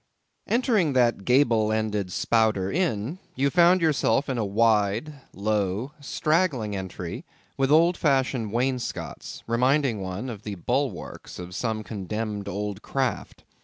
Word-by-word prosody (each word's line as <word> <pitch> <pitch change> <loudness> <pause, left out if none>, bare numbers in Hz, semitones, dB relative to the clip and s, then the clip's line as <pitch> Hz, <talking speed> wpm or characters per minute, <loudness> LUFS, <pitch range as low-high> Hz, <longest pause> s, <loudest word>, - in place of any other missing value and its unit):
Entering 225 - +2
that 120 -6 +2
gable 120 -5 +3
ended 105 -4 -1
Spouter 110 -3 +1
Inn, 155 - -1 0.2
you 140 +2 +1
found 180 +1 +5
yourself 150 -2 +2
in 130 -3 -1
a - - +1
wide, 105 +5 +2 0.2
low, 105 +4 -1
straggling 145 - 0
entry 95 -2 -6 0.3
with 135 0 +1
old 165 +4 +5
fashioned 130 -6 +1
wainscots, 125 +2 -3
reminding 125 -1 +2
one 95 +6 -4
of 110 -5 -6
the 105 -1 -5
bulwarks 125 +3 -3
of 90 0 -8
some 110 +1 -2
condemned 105 0 -4
old 100 +1 -4
craft. 135 -1 -3
115 Hz, 130 wpm, -25 LUFS, 105-140 Hz, 0.3 s, found